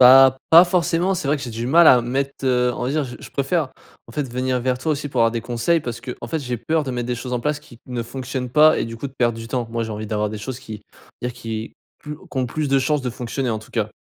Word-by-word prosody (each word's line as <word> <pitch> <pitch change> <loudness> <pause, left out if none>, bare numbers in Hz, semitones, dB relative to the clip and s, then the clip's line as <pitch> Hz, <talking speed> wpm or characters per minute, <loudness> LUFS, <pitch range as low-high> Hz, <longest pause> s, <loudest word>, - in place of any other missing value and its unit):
Bah, 130 +1 +8
pas 170 +2 +10
forcément, 175 +1 +1
c'est 145 -5 -3
vrai 150 - +3
que 140 - -8
j'ai 120 - -6
du 115 +1 -4
mal 165 +5 +6
à 125 - +8
mettre, 135 +3 -3
heu, 125 -1 +2
on 125 - -3
va 130 - -1
dire 150 0 0
j 125 -2 -8
je - - -10
préfère 140 +1 0 0.4
en - - -12
fait 145 +1 -1
venir 125 +1 -1
vers 125 +1 0
toi 155 +3 0
aussi 145 0 -3
pour 130 -3 -1
avoir 115 0 +5
des 115 -1 -2
conseils 120 +8 +1
parce 120 -3 -5
qu'en 125 -1 -7
fait 155 +6 -2
j'ai 125 -2 -3
peur 155 +8 0
de 135 - -4
mettre 120 -1 -3
des 125 - -1
choses 125 +1 -6
en 125 - +1
place 150 +1 -1
qui 120 - -16
ne 125 -2 -3
fonctionnent 130 +1 -5
pas 155 +3 +6
et - - 0
du 115 0 -6
coup 140 - -4
de 135 - -11
perdre 120 -2 +1
du 115 - -7
temps. 120 -2 -2
Moi 115 0 -1
j'ai 110 - -6
envie 105 0 -5
d'avoir 105 0 -1
des 110 - -5
choses 125 +4 -5
qui 110 -5 -9 0.4
on - - 0
va - - 0
dire - - -6
qui 115 -2 -6 0.2
plus 150 0 -7
qui 140 - -8
ont 130 - +1
plus 150 +4 -2
de 135 - +4
chance 150 +2 +1
de 125 - -2
fonctionner 125 +2 -3
en 110 - -1
tout 110 - -16
cas. 110 -2 -2
125 Hz, 305 wpm, -22 LUFS, 120-140 Hz, 0.4 s, pas